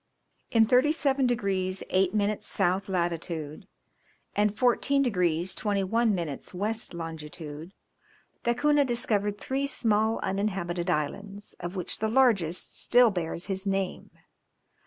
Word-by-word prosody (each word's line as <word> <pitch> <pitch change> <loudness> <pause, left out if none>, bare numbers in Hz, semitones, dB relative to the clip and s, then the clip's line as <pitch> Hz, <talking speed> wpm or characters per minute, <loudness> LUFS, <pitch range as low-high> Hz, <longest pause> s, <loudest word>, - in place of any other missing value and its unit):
In 225 -1 +5
37 270 +2 +3
degrees 195 -5 -1
8 185 0 +3
minutes 205 0 0
south 190 0 0
latitude, 170 -2 -2 0.7
and 210 0 +1
14 265 +3 +3
degrees 180 -6 0
21 210 +2 +1
minutes 165 -1 -5
west 215 0 -2
longitude, 160 +1 -7 0.7
Da 235 0 +1
Cunha 295 +2 +3
discovered 210 -5 0
three 270 +5 -2
small 220 -4 +2
uninhabited 190 -3 -2
islands, 200 +7 -3
of 175 +2 -5
which 180 -3 -2
the 220 - 0
largest 215 -9 +1
still 245 -2 +5
bears 170 -2 -3
his 195 0 -2
name. 195 -1 -2
200 Hz, 115 wpm, -28 LUFS, 175-230 Hz, 0.7 s, In